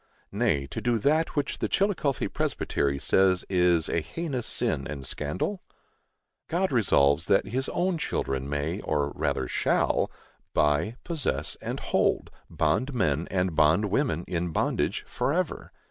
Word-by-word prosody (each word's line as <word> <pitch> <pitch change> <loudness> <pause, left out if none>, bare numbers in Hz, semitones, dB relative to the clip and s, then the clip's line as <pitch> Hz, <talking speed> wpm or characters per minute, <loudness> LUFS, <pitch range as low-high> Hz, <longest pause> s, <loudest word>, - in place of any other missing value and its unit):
Nay, 100 - +1
to 70 - -6
do 120 -1 +2
that 155 +10 +1
which 145 -2 -1
the - - 0
Chillicothe 185 -9 0
Presbytery 70 0 0
says 95 +5 +3
"is 90 -3 +3
a - - +1
heinous 140 - -4
sin - - -1
and 70 -2 -6
scandal"? 80 - -2 0.9
God 185 +3 0
resolves 80 - +3
that 95 - +4
his 130 +5 -2
own 180 -2 0
children 70 - -2
may, 75 +6 -2
or 75 -2 0
rather - - -1
"shall," - - +1 0.5
"buy, 75 +10 +2
possess 145 - -2
and - - -4
hold," - - +1 0.2
bond 105 - 0
men 80 - +1
and 90 -3 0
bond 80 +7 +3
women, 110 - 0
in 90 0 -1
bondage, 80 - -1
forever. - - -1
90 Hz, 140 wpm, -27 LUFS, -, 0.9 s, that